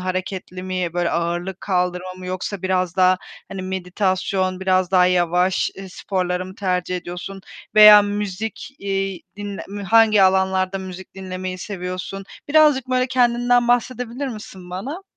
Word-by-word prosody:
Hareketli 185 0 -4
mi, 185 -2 -3
böyle, 175 -1 0
ağırlık 175 +2 -2
kaldırma 180 -1 -1
mı 185 0 -10
yoksa 185 +1 -4
biraz 185 -1 0
daha, 185 0 +4 0.3
hani, 195 -1 -6
meditasyon, 185 0 -1
biraz 185 -1 +1
daha 180 -1 +5
yavaş, 180 +1 +2
ııı, 195 - -8
sporları 180 -1 -2
mı 185 - -10
tercih 180 -2 -1
ediyorsun? 180 +2 -7 0.3
Veya 210 -1 +10
müzik, 205 +1 -4
iii, 195 -2 -2
dinle 205 -1 -6
m 205 +1 -6
hangi 215 0 +5
alanlarda 190 0 +2
müzik 190 0 -9
dinlemeyi 185 -1 -5
seviyorsun? 185 0 -5 0.2
Birazcık 295 -4 +4
böyle 255 0 +1
kendinden 245 -1 +2
bahsedebilir 245 +2 -1
misin 195 -6 -9
bana? 270 - -5
190 Hz, 140 wpm, -21 LUFS, 185-205 Hz, 0.3 s, Veya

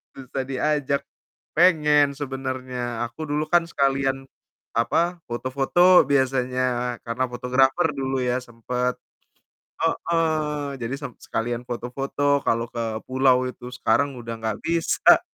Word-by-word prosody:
Susah 130 0 -5
diajak. 140 +1 0 0.6
Pengen 150 -5 +5
sebenarnya, 130 -3 -4
aku 150 +6 -7
dulu 150 +1 0
kan 175 -1 +5
sekalian, 135 -2 0 0.5
apa, 170 +9 +1
foto-foto 135 +9 +4
biasanya 130 -2 0
karena 120 +2 -1
fotografer 130 +6 +2
dulu 135 -1 -2
ya 125 0 +1
sempat. 125 +1 -2 0.9
Heeh. 155 -4 0
Jadi 120 +3 -3
sem 140 -4 -6
sekalian 120 +2 -3
foto-foto 135 +4 -1
kalau 115 +1 +1
ke 115 -2 -3
pulau 130 -1 +3
itu, 125 -1 -9
sekarang 140 +2 +1
udah 115 0 -6
gak 110 -1 -1
bisa. 165 0 +4
130 Hz, 115 wpm, -24 LUFS, 125-145 Hz, 0.9 s, Pengen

